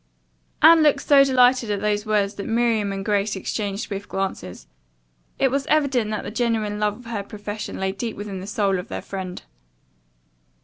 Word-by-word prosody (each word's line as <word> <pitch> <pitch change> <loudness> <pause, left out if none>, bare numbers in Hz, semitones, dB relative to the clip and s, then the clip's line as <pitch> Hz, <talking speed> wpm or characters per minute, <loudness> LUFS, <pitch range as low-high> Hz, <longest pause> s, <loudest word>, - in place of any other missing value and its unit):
Anne 330 -1 +8
looked 300 -2 +3
so 280 -1 +6
delighted 255 -3 +3
at 205 -1 -1
those 210 +1 -1
words 205 -1 +1
that 200 0 -6
Miriam 225 -3 +1
and 195 0 -5
Grace 205 0 0
exchanged 200 +2 -3
swift 200 0 -6
glances. 190 - -4 0.7
It 265 - +2
was 275 +1 -1
evident 275 -8 +2
that 215 -1 -3
the - - -6
genuine 220 -3 -1
love 210 -1 0
of 245 - -15
her 230 -3 -3
profession 205 +1 -6
lay 190 0 -1
deep 220 +4 -5
within 205 -2 -6
the 190 - -8
soul 200 -2 0
of 180 - -7
their - - -6
friend. 185 -2 -6
210 Hz, 180 wpm, -23 LUFS, 200-240 Hz, 0.7 s, Anne